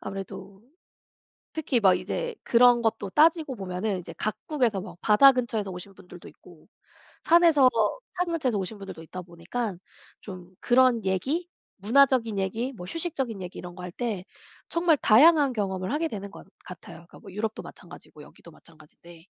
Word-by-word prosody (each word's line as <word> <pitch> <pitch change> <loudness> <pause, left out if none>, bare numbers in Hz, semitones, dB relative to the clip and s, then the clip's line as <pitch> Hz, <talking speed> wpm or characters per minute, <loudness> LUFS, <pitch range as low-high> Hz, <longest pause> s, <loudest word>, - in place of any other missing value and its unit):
아무래도 195 0 -8 0.9
특히 290 -6 -1
막 190 -3 +5
이제 - - -4
그런 240 0 +4
것도 220 -3 -1
따지고 315 - +3
보면은 190 0 -3
이제 165 - -10
각국에서 230 -1 -1
막 185 -2 -10
바다 270 +6 +6
근처에서 225 -6 -2
오신 185 +2 -9
분들도 180 -2 -14
있고 170 -3 -18 0.6
산에서 330 -5 +5
뭐 225 - 0 0.2
산 360 0 0
근처에서 255 -10 -1
오신 195 +3 -5
분들도 195 -5 -9
있다 180 +3 -8
보니깐 175 +4 -5 0.4
좀 185 -3 -10
그런 245 -3 +3
얘기 270 - -1 0.3
문화적인 230 0 +3
얘기 225 +8 -2
뭐 180 -6 -9
휴식적인 265 - -4
얘기 180 - -8
이런 175 0 -9
거 180 - -10
할 180 - -6
때 215 -6 -4 0.4
정말 335 -2 +2
다양한 285 +4 +5
경험을 190 -2 -3
하게 320 +2 -1
되는 200 -6 -7
것 - - -13 0.2
같아요. 170 -1 -12 0.2
뭐 190 - -12
유럽도 215 +2 -4
마찬가지고 - - -13
여기도 - - -16
마찬가진데. 165 +1 -18
215 Hz, 355 characters per minute, -26 LUFS, 185-260 Hz, 0.9 s, 바다